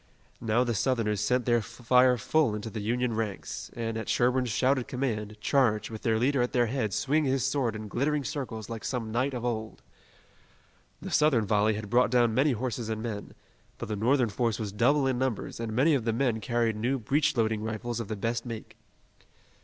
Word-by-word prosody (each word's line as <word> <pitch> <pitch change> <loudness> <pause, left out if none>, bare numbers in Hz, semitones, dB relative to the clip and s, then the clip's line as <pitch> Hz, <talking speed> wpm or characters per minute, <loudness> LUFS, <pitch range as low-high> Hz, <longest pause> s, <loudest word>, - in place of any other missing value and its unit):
Now 115 +1 +2
the 120 -1 -1
Southerners 110 -2 0
sent 125 +3 +1
their 120 -1 +3
fire 125 +2 +3
full 120 +1 +1
into 105 +1 -5
the 110 - -5
Union 120 +3 0
ranks, 100 - -4
and, 115 -1 -3
at 110 - -6
Sherburne's 125 0 +2
shouted 130 +4 +1
command, 110 -5 -3
charged, 110 -5 +2
with 110 - -7
their 110 -2 +1
leader 130 +3 +2
at 120 - -1
their 120 -1 +3
head 115 -3 -1
swinging 145 - +1
his 135 -1 +1
sword 135 -5 0
in 110 0 -6
glittering 145 +7 0
circles 125 -8 -5
like 115 -2 -6
some 115 -4 -3
knight 130 +4 0
of 120 -1 -4
old. 110 -2 -4 1.2
The - - -6
Southern 145 -8 +3
volley 105 +1 +2
had 105 -1 -6
brought 125 +1 +4
down 120 -2 +3
many 135 +4 +3
horses 120 -1 -3
and 110 0 -3
men, 105 -3 -5 0.4
but - - -6
the 105 - -1
Northern 120 +3 +2
force 115 +1 0
was 105 -3 -4
double 135 +7 +3
in 130 -2 0
numbers 130 -5 -2
and 115 -1 -3
many 135 +8 +3
of 135 -5 +1
the 115 0 0
men 120 -2 +1
carried 115 -1 0
new 125 +5 0
breech 135 +4 +1
loading 110 -2 +1
rifles 110 +2 -3
of 115 - -4
the 110 - -3
best 115 +3 -2
make. 115 -3 -8
120 Hz, 200 wpm, -28 LUFS, 110-130 Hz, 1.2 s, brought